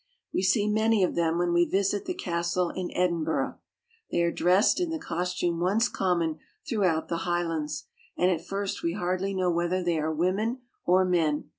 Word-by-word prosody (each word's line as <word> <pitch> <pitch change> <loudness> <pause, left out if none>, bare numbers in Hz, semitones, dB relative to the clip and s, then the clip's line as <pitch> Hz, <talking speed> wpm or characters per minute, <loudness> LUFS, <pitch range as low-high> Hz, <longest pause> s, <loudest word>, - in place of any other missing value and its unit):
We - - +1
see 205 +2 +2
many 215 -1 +3
of 180 - +1
them 170 -1 +1
when 175 0 +1
we 175 0 +5
visit 195 +2 0
the 360 - -3
castle 175 - -1
in 185 -1 -4
Edinburgh. 170 -3 0 0.5
They 170 - +1
are 170 - +2
dressed 185 - +3
in 355 -2 0
the 325 - -2
cos 180 - -3
tume 170 -1 0
once 200 +7 +2
common 170 -4 0 0.3
through 220 -9 +1
out 160 -3 +1
the 170 - -2
Highlands, 165 -4 -2 0.3
and 180 +1 +3
at 170 -2 -2
first 195 +2 -3
we 170 - -1
hardly 185 +1 -1
know 185 -1 +1
whether 175 +2 0
they 170 -2 +1
are 155 +1 -1
women 195 - 0 0.3
or 185 +1 +5
men. 165 -5 +1
180 Hz, 190 wpm, -27 LUFS, 170-195 Hz, 0.5 s, we